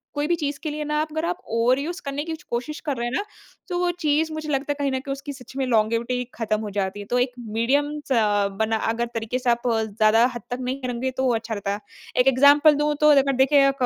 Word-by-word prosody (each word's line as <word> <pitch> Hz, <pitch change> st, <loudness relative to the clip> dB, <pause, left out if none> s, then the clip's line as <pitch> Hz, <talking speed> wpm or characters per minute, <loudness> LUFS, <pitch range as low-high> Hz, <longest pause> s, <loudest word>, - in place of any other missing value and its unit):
कोई 290 Hz, +1 st, 0 dB
भी 345 Hz, -, +2 dB
चीज़ 290 Hz, -4 st, -3 dB
के 310 Hz, -, -2 dB
लिए 300 Hz, 0 st, -4 dB
ना 300 Hz, 0 st, -1 dB
आप 310 Hz, -, -1 dB
अगर 315 Hz, +2 st, -2 dB
आप 350 Hz, +1 st, -1 dB
ओवरयूज़ 255 Hz, +9 st, +1 dB
करने 280 Hz, +1 st, -3 dB
की 325 Hz, +1 st, -4 dB, 0.2 s
कोशिश 245 Hz, +6 st, -3 dB
कर 290 Hz, -3 st, -2 dB
रहे 235 Hz, -, -2 dB
हैं 240 Hz, -, -4 dB
ना। 335 Hz, -, 0 dB, 0.5 s
तो 355 Hz, -, -1 dB
वो 355 Hz, 0 st, +1 dB
चीज़ 310 Hz, +2 st, +2 dB
मुझे 310 Hz, -1 st, -5 dB
लगता 275 Hz, 0 st, -1 dB
है -, -, -1 dB
कहीं 280 Hz, -1 st, 0 dB
ना 260 Hz, -, -1 dB
कहीं 275 Hz, +1 st, -6 dB
उसकी 280 Hz, +1 st, -7 dB
सच 260 Hz, -1 st, -13 dB
में 270 Hz, -, 0 dB
लॉन्गेविटी 230 Hz, +2 st, +1 dB
खत्म 215 Hz, -2 st, -1 dB
हो 215 Hz, -, -4 dB
जाती 195 Hz, +1 st, -1 dB
है। 205 Hz, -, -7 dB
तो 245 Hz, +4 st, 0 dB
एक 250 Hz, +1 st, +1 dB
मीडियमस 275 Hz, +7 st, -1 dB
अ, 210 Hz, -4 st, +3 dB
बना 220 Hz, +3 st, 0 dB
अगर 235 Hz, +1 st, -1 dB
तरीके 230 Hz, +2 st, -2 dB
से 250 Hz, -, 0 dB
आप 235 Hz, 0 st, +2 dB
ज़्यादा 220 Hz, 0 st, +3 dB
हद 240 Hz, -, -5 dB
तक 245 Hz, -, -2 dB
नहीं 255 Hz, +2 st, -3 dB
करोगे 255 Hz, +1 st, -2 dB
तो 260 Hz, -, 0 dB
वो 250 Hz, -, +3 dB
अच्छा 225 Hz, 0 st, -4 dB
रहता। 200 Hz, -1 st, -3 dB, 0.4 s
एक 250 Hz, -, +1 dB
एग्ज़ाम्पल 285 Hz, +3 st, +6 dB
दूँ 295 Hz, +1 st, +1 dB
तो 300 Hz, -, +6 dB
अगर 275 Hz, 0 st, +3 dB
देखें 275 Hz, 0 st, +5 dB
260 Hz, 250 wpm, -23 LUFS, 230-290 Hz, 0.5 s, एग्ज़ाम्पल